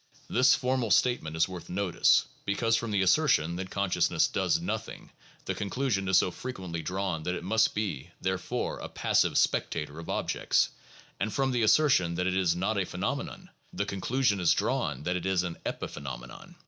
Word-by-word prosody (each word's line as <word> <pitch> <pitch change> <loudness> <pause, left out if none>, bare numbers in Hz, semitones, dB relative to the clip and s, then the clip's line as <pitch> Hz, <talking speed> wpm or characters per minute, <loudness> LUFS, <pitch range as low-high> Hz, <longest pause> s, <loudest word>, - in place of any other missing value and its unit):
This 130 +1 +5
formal 125 -2 -1
statement 95 -6 +2
is 80 - +3
worth 90 -3 -9
notice, 95 -1 +3 0.2
because 115 +3 +1
from 115 0 -2
the 100 -2 +1
assertion 90 - +3
that 95 0 -5
consciousness 100 -1 +1
does - - +1
nothing, - - -5 0.3
the - - -1
conclusion 105 -2 -1
is 95 - +4
so 90 - +3
frequently 95 -8 -6
drawn 90 -1 -2
that 90 +3 -2
it - - -6
must 110 +4 +2
be, 90 -8 -3
therefore, 95 0 -2
a - - -7
passive - - +1
spectator 75 +1 0
of 85 - -9
objects, - - +1 0.5
and 110 - -1
from 135 +2 0
the 120 -2 0
assertion 110 - +4
that 90 +1 -1
it 95 0 0
is 90 -3 +2
not 100 +4 0
a 95 - 0
phenomenon, - - -4 0.2
the - - -1
conclusion 110 +2 0
is 90 - +4
drawn 70 -1 -1
that 90 +3 -1
it 90 - -4
is 95 -2 +2
an 85 -2 -5
epiphe - - -5
nomenon. 65 -3 -8
95 Hz, 180 wpm, -29 LUFS, 85-110 Hz, 0.5 s, This